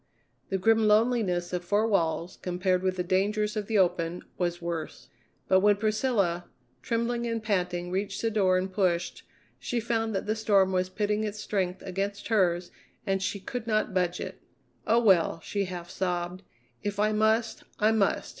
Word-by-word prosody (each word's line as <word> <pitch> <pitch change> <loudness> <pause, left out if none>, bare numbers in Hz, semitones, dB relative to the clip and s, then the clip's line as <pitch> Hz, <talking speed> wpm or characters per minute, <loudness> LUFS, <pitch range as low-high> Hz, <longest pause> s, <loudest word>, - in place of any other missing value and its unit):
The 195 - 0
grim 220 +3 +3
loneliness 210 -6 +2
of 180 -1 -2
four 205 +5 +2
walls, 170 -4 0
compared 180 0 0
with 185 0 0
the 180 - -1
dangers 210 +4 0
of 210 -2 -3
the 220 - +1
open, 175 -2 +1
was 175 -1 -1
worse. 170 -2 -5 0.4
But 190 - +5
when 205 +1 +4
Priscilla, 205 -5 0 0.4
trembling 235 0 -1
and 230 -1 -2
panting, 180 -4 -1
reached 195 +1 -2
the 225 - +1
door 190 -4 +3
and 185 +1 -2
pushed, 180 -3 0 0.4
she 245 - -2
found 225 -1 -1
that 195 - -2
the 215 +1 0
storm 200 -3 +3
was 185 0 0
pitting 210 +2 -1
its 210 0 -4
strength 190 -3 -2
against 195 +3 -3
hers 180 -5 +2 0.3
and 195 -2 0
she 200 +1 -2
could 225 +4 -6
not 215 -3 +1
budge 180 -1 0
it. - - -7 0.5
"Oh, 230 +2 +4
well," 175 -5 +4
she 200 +3 -2
half 175 -2 -7
sobbed; 180 0 -2 0.4
"if 205 -1 -3
I 215 +1 +3
must, 220 +2 +1
I 215 +1 +3
must." 220 -3 +1
195 Hz, 175 wpm, -28 LUFS, 180-215 Hz, 0.5 s, But